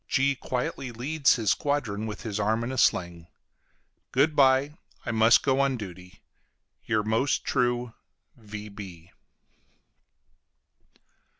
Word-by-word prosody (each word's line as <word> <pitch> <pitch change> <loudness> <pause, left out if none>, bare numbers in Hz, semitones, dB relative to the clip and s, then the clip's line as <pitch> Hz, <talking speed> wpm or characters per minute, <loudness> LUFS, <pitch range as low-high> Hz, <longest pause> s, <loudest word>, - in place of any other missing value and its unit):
G 135 +1 +2
quietly 125 0 -4
leads 140 +5 +1
his 110 -5 +1
squadron 110 -8 -1
with 110 +2 -7
his 110 -3 -4
arm 110 +3 0
in 120 - -3
a 130 - -5
sling. 85 -5 +1 0.8
Good 145 +4 +2
bye, 135 +1 +4 0.3
I - - -2
must 115 +1 +5
go 135 -1 +2
on 135 -2 +1
duty. 90 -4 -10 0.6
YOUR 110 -2 0
MOST 110 +6 0
TRUE 120 -2 0 0.4
V. 105 -6 -10
115 Hz, 115 wpm, -27 LUFS, 105-135 Hz, 0.8 s, must